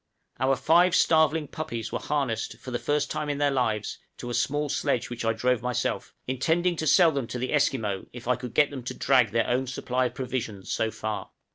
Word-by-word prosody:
Our 135 +1 +3
five 170 +6 +4
starveling 160 -2 +3
puppies 120 -8 -5
were - - -2
harnessed, 140 -6 -2
for 130 - -9
the 120 - -1
first 145 0 0
time 150 -1 -2
in 145 - -1
their 145 0 +2
lives, 110 -6 -1 0.2
to 120 - -6
a - - -3
small 145 +4 0
sledge 125 -3 -1
which 120 - -4
I 115 - +2
drove 120 +1 +1
myself, 125 -1 -2
intending 160 +8 +1
to 155 - -2
sell 170 +2 +6
them 140 -5 -2
to 125 - -5
the 130 +3 -2
Esquimaux, 115 -9 0
if 120 -1 -10
I 125 - +3
could 125 -2 -8
get 145 -1 +4
them 135 -2 -6
to - - -4
drag 130 -5 +3
their 115 +1 +1
own 130 +2 0
supply 130 0 -1
of - - -11
provisions 120 -7 -4
so 110 - +1
far. 110 -1 -4
130 Hz, 220 wpm, -27 LUFS, 120-145 Hz, 0.2 s, sell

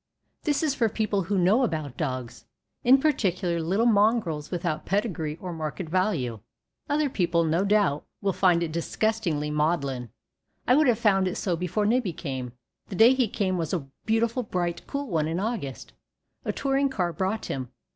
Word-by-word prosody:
This 295 0 +1
is 300 -3 +2
for 230 -5 +1
people 215 -2 0
who 195 +2 -1
know 190 +8 +4
about 155 - -2
dogs, 130 -7 -4 0.4
in 260 +3 +6
particular 185 - +1
little 190 +8 +1
mongrels 205 -9 +2
without 175 -3 -2
pedigree 180 -7 -1
or 180 -2 -5
market 160 +2 -4
value. 165 - 0 0.5
Other 295 +1 +2
people, 170 -8 +1
no 165 +3 +1
doubt, 200 -8 +2 0.2
will 200 -2 0
find 175 -3 +3
it 165 - -3
disgustingly 170 -3 -1
maudlin. 145 -5 0 0.6
I 250 - +5
would 305 0 +4
have 240 -3 +4
found 195 -5 +3
it 180 - -2
so 180 -3 -1
before 180 +5 -1
Nibbie 220 -4 +1
came. 130 -6 -5 0.3
The 195 - -6
day 230 +6 +7
he 260 -3 +2
came 185 -3 -1
was 165 0 -2
a 145 -6 -4 0.2
beautiful 230 +2 +1
bright, 175 -6 -3
cool 280 0 -3
one 160 -7 0
in 165 +1 -2
an 200 - -1
August. 185 - -5 0.5
A - - 0
touring 275 0 +1
car 180 -9 -1
brought 195 +5 -2
him. 130 -3 -4
185 Hz, 175 wpm, -26 LUFS, 160-220 Hz, 0.6 s, day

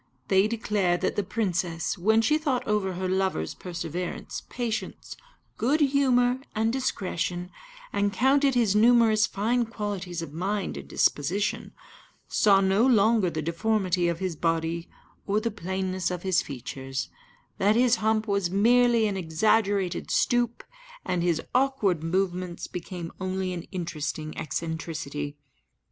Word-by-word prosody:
They 190 +1 +4
declare 210 -5 0
that 185 - -1
the - - +1
princess, 180 -5 -1
when 220 +4 +3
she 305 +5 +3
thought 275 -6 -1
over 205 -3 0
her 185 +1 -3
lover's 190 - 0
perseverance, 175 0 -5
patience, 235 -3 -4 0.4
good 280 +7 +2
humour, 260 -3 +3 0.2
and 225 +1 +1
discretion, 180 -8 -2 0.4
and 200 0 +1
counted 270 +4 +3
his 225 -5 +3
numerous 225 -1 +5
fine 230 +4 0
qualities 195 -6 -4
of 145 -3 -8
mind 195 +5 -2
and - - -8
disposition, 180 +8 0 0.6
saw 195 -2 +4
no 195 +3 +3
longer 220 -5 +4
the 155 -2 -4
deformity 180 +1 0
of 170 -1 0
his 185 -2 -3
body 165 +1 -1 0.4
or 205 +1 +2
the 230 +1 -2
plainness 190 -1 -2
of 180 -1 -4
his 190 -2 +2
features; 130 0 -5 0.5
that 205 +2 +3
his 245 -1 +4
hump 220 0 +1
was 200 -3 +1
merely 235 +3 +4
an 205 -2 -1
exaggerated 195 +2 +1
stoop, 240 -1 +1 0.4
and 180 -1 0
his 170 -2 +1
awkward 245 - +1
movements 180 0 -1
became 175 -1 -6
only 185 0 -2
an 175 -1 -6
interesting 155 -4 -4
eccentricity. 155 -2 -4
190 Hz, 135 wpm, -26 LUFS, 175-220 Hz, 0.6 s, numerous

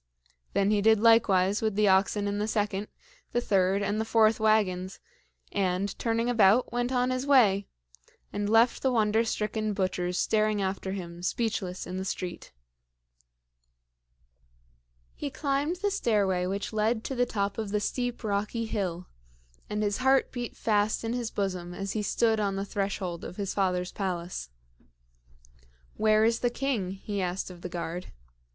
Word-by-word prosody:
Then 200 +1 +2
he 210 -1 +2
did 220 0 +5
likewise 205 -4 +4
with 220 -2 0
the 210 0 +3
oxen 200 +2 +3
in 205 0 -2
the 210 - -1
second, 210 -2 -1 0.5
the 240 - +2
third, 195 -3 +2
and 205 +2 0
the - - 0
fourth 220 -1 +3
wagons, 195 -4 +1 0.5
and, 190 0 -1
turning 230 0 0
about, 230 0 +4
went 245 +1 0
on 250 0 +1
his 255 +2 -2
way, 205 -8 +4 0.7
and 205 0 -2
left 225 +2 +4
the 265 - +2
wonder 220 -1 +2
stricken 215 -1 -2
butchers 185 -2 -1
staring 215 -1 +1
after 190 0 -2
him, 175 -3 -7
speechless, 190 -2 -2
in 180 +1 -5
the 190 - -3
street. 180 -2 -5 2.6
He 290 - -5
climbed 280 +4 -1
the 405 +3 -1
stairway 200 - +1
which 200 +3 -3
led 220 +1 +1
to - - -4
the 245 -1 +1
top 200 0 -2
of 215 -2 -3
the 210 +1 0
steep, 245 +3 -3
rocky 210 +2 -1
hill, 185 -5 -3 0.6
and 210 0 -1
his 205 -1 0
heart 265 +1 +3
beat 245 -2 -5
fast 210 0 +1
in 225 +1 -2
his 240 -2 -2
bosom 180 -4 -3
as 195 +1 -4
he 215 - -1
stood 220 +1 +1
on 200 -2 0
the 195 +1 -2
threshold 195 -4 -3
of - - -7
his 200 -2 -2
father's 180 -2 0
palace. 175 - -4 1.4
"Where 215 0 +3
is 230 +1 +2
the 245 - +1
king?" 240 -7 -1
he 200 +1 -4
asked 185 +1 -3
of 175 -1 -12
the 180 - -5
guard. 175 +1 -5
205 Hz, 160 wpm, -28 LUFS, 190-225 Hz, 2.6 s, did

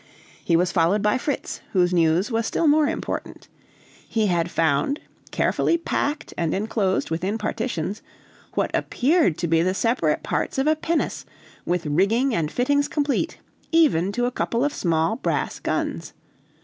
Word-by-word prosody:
He 170 - +2
was 175 +2 +2
followed 185 +3 +2
by 210 +4 +2
Fritz, 285 +1 -3
whose 180 -2 +3
news 170 +5 +2
was 225 0 0
still 335 - 0
more 300 0 +4
important. 325 +2 -5 0.6
He 220 -2 +1
had 175 -3 +1
found, 160 - +1 0.3
carefully 335 - +1
packed 300 -2 -2
and 165 -2 0
enclosed 200 -3 -1
within 185 +6 -1
partitions, 215 -3 -3 0.5
what - - 0
appeared 285 - +2
to 170 - -1
be 165 0 +3
the 185 +2 +1
separate 195 -10 +1
parts - - -2
of 270 - +1
a 310 +1 +4
pinnace, 325 +1 -1 0.4
with 175 -1 0
rigging 205 - +2
and 160 -6 -1
fittings 285 +5 +1
complete, 290 -2 -1 0.3
even 280 - +3
to 245 +2 0
a 245 - 0
couple 240 +1 0
of 290 - -1
small 165 +5 0
brass - - -2
guns. - - -3
210 Hz, 155 wpm, -23 LUFS, 170-270 Hz, 0.6 s, more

